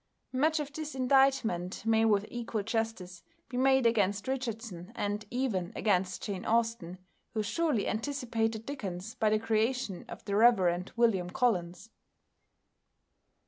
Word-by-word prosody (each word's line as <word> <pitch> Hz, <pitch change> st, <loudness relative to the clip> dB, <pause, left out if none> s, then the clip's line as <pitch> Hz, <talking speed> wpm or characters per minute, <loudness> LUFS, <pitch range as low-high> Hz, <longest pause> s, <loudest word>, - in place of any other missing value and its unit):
Much 310 Hz, +5 st, +2 dB
of 290 Hz, -1 st, -5 dB
this 310 Hz, -1 st, -5 dB
indictment 255 Hz, -9 st, +2 dB
may 225 Hz, 0 st, +3 dB
with 210 Hz, -2 st, +3 dB
equal 230 Hz, -3 st, -3 dB
justice 225 Hz, -5 st, -3 dB, 0.3 s
be 250 Hz, -, -7 dB
made 265 Hz, 0 st, +4 dB
against 205 Hz, -3 st, +2 dB
Richardson 225 Hz, -8 st, -4 dB
and 205 Hz, +1 st, -2 dB
even 220 Hz, -8 st, -1 dB
against 185 Hz, -3 st, 0 dB
Jane 195 Hz, -3 st, -4 dB
Austen, 230 Hz, -6 st, 0 dB, 0.4 s
who 215 Hz, -, +1 dB
surely 295 Hz, -1 st, 0 dB
anticipated 225 Hz, -3 st, -2 dB
Dickens 205 Hz, -7 st, -5 dB
by 220 Hz, -4 st, +1 dB
the 215 Hz, -, +3 dB
creation 225 Hz, -2 st, 0 dB
of -, -, -9 dB
the 200 Hz, -, -1 dB
Rev. 185 Hz, -6 st, +4 dB
William 200 Hz, -7 st, +2 dB
Collins. 180 Hz, -2 st, -1 dB
225 Hz, 130 wpm, -30 LUFS, 195-250 Hz, 0.4 s, made